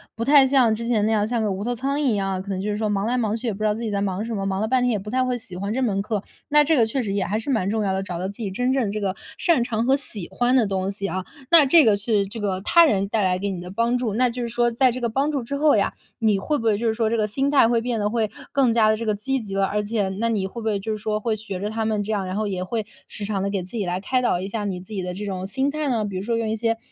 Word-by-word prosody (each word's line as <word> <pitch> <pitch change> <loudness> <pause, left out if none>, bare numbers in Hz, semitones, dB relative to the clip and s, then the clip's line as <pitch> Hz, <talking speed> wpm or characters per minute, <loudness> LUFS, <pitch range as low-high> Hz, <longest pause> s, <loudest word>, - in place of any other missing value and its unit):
不 230 - -3
太 280 0 +7
像 260 -4 +4
之 230 +1 -5
前 215 -3 +2
那 220 - +1
样 210 -1 +2
像 230 +1 -1
个 215 - 0
无 195 +2 -3
头 245 +1 -1
苍 275 +4 -2
蝇 - - 0
一 240 -6 +2
样， 195 -1 -1
可 195 - -10
能 190 -1 -2
就 210 - -2
是 - - -1
说 215 -1 -1
忙 200 0 0
来 245 +2 0
忙 220 -3 0
去 235 - -5
也 215 - 0
不 195 - -10
知 215 - -1
道 210 - +3
自 230 - -5
己 225 - -2
在 200 -1 -1
忙 200 +1 -2
什 230 - -4
么， 195 -1 -3
忙 190 0 -1
了 215 - 0
半 255 +2 +2
天 250 - +2
也 215 - 0
不 210 +2 -8
太 255 +2 +1
会 250 -1 -1
喜 195 -6 -8
欢 200 +3 -3
这 265 - -1
门 200 -6 0
课， 210 -1 -2 0.3
那 295 0 +6
这 320 +1 +3
个 235 - +4
确 240 +4 -1
实 200 -4 -3
也 200 -2 0
还 210 +2 -1
是 225 - -6
蛮 220 -8 +1
重 220 +1 0
要 195 -2 0
的， 190 - -1
找 180 -3 -5
到 185 - -2
自 200 - -6
己 210 -4 -4
真 250 +6 0
正 235 -7 0
这 215 - -3
个 195 -2 -2 0.2
擅 330 -9 +3
长 230 -1 -1
和 265 +2 +4
喜 215 -10 -5
欢 245 +1 +1
的 225 - +3
东 195 0 -1
西 195 0 -4
啊。 185 -1 -3 0.3
那 330 -4 +8
这 305 +3 +6
个 215 -2 +5
是 200 -1 +1
这 225 +3 -6
个 190 -2 -1
他 340 - +6
人 200 -9 +1
带 210 -1 0
来 185 -1 +1
给 200 +1 -2
你 185 -3 -4
的 180 - -8
帮 230 +4 +1
助， 240 -4 -2
那 250 +2 +4
就 245 +1 -5
是 235 - -3
说 240 +1 +1
在 250 +2 +3
这 255 - -4
个 240 - 0
帮 275 +6 0
助 280 -4 -1
之 260 +5 -5
后 290 -4 +4
呀， 200 - +1 0.3
你 215 -3 +3
会 295 +10 -1
不 230 - -5
会 215 -2 +3
就 230 - -1
是 220 - +2
说 220 -1 0
这 230 - 0
个 215 -2 +1
心 270 +6 0
态 275 -5 +5
会 235 -1 +2
变 235 0 -2
得 205 - +1
会 220 -2 0 0.2
更 260 -5 +3
加 220 -2 +4
地 215 - +2
这 230 - -4
个 215 - +1
积 270 +6 -1
极 195 -2 -6
了， 195 0 +2
而 210 +2 -1
且 210 -1 -1
那 230 +1 +1
你 205 -4 0
会 235 +4 -8
不 - - -8
会 210 -2 0
就 220 +3 -4
是 215 - -2
说 215 0 -2
会 220 0 -1
学 205 -3 -6
着 205 +2 -3
他 220 0 -2
们 215 -1 0
这 210 - -3
样， 200 -3 -1
然 185 0 -4
后 215 0 -1
也 185 -2 -3
会 215 +3 -3 0.2
时 205 - -6
常 200 -2 -2
地 200 - -1
给 200 -1 -2
自 180 - -10
己 205 - -1
来 180 +1 -2
开 255 +6 0
导 240 -7 +1
一 190 - -4
下 210 +1 -3
你 185 -3 -3
自 185 +4 -11
己 195 - -2
的 180 0 -4
这 205 +3 -5
种 190 -2 -4
心 265 +8 0
态 300 0 -2
呢， 225 -4 0
比 195 -2 -5
如 185 - -2
说 230 +1 -1
用 225 -1 -1
一 220 - 0
些 225 0 0
215 Hz, 385 characters per minute, -23 LUFS, 200-240 Hz, 0.3 s, 那